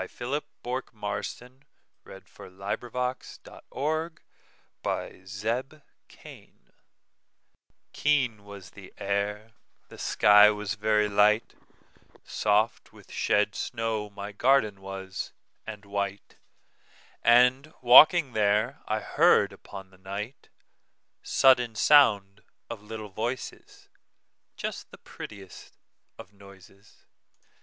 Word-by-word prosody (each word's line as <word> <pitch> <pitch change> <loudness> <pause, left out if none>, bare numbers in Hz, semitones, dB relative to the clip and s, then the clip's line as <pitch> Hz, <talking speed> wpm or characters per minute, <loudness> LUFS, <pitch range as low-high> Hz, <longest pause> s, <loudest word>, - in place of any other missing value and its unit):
Philip 135 +5 -4 0.2
Bourke 125 -1 -5
Marston 125 +5 -6 0.4
1850–87 120 +7 -6 0.2
Garden 160 +3 -2 1.9
Fairies - - -16 1.3
KEEN 130 -8 0
was 100 -3 -12
the 95 -2 -14
air, 105 +2 -3 0.4
the - - -13
sky 105 0 +6
was 105 -1 -3
very 105 -1 +1
light, 105 +2 +2 0.7
Soft 105 +1 0
with - - -18
shed 105 0 +1
snow 110 -2 -3
my 100 0 -8
garden 110 -3 +1
was, 95 -1 -7 0.3
and 105 -2 -8
white, 100 0 -5 0.8
And, 125 +5 +4
walking 140 +3 +7
there, 110 +5 +1
I 110 0 -1
heard - - +3
upon 95 -1 -12
the 95 - -21 1.3
nightSudden 125 -4 +3
sound 105 -9 +4 0.3
of 115 -3 -7
little 110 0 -8
voices, 115 +6 -6 0.7
Just - - -6
the - - -14
prettiest 100 -3 -12 0.4
of 100 - -13
noises. 100 0 -19
105 Hz, 90 wpm, -27 LUFS, 100-125 Hz, 1.9 s, walking